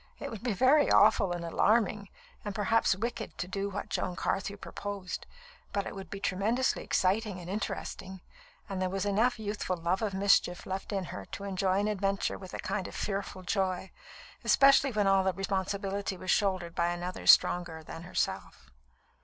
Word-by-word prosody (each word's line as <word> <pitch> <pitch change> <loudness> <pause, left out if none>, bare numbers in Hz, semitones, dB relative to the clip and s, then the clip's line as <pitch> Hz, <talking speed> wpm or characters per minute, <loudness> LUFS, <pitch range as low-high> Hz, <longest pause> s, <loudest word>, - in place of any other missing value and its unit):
It - - -6
would 220 -3 -7
be 240 -3 -1
very 265 +9 +4
awful 195 -4 +5
and 175 -1 -3
alarming, 205 +3 +2 0.3
and 205 -2 -5
perhaps 215 -1 +2
wicked, 230 +2 -4
to 180 - -3
do 195 +1 -3
what 195 - -5
Joan 180 - -2
Carthew 200 +3 -2
proposed, 200 -2 -6 0.4
but 200 -1 -1
it - - -5
would 195 -3 -8
be 200 - -6
tremendously 210 +7 0
exciting 195 +1 +1
and 175 - -9
interesting; 190 -1 -4 0.5
and 195 -2 -4
there 185 - +1
was 195 +1 -2
enough 220 +5 +2
youthful 205 -4 -3
love 170 +3 0
of 205 -3 -1
mischief 190 -2 +3
left 190 +2 -4
in 195 -2 -1
her 100 - -6
to 200 - -8
enjoy 190 -1 0
an 205 - +1
adventure 195 -1 -1
with 185 -2 -9
a - - -6
kind 195 0 -2
of - - -10
fearful 195 -2 -3
joy, 190 -1 -1 0.5
especially 275 0 +5
when 210 -3 +1
all 195 -1 +4
the 190 0 +1
responsibility 195 0 -2
was 185 0 -2
shouldered 185 -4 +1
by 170 0 +1
another 175 +1 -4
stronger 170 -2 +5
than 165 - -8
herself. 115 - -3
195 Hz, 180 wpm, -30 LUFS, 185-205 Hz, 0.5 s, awful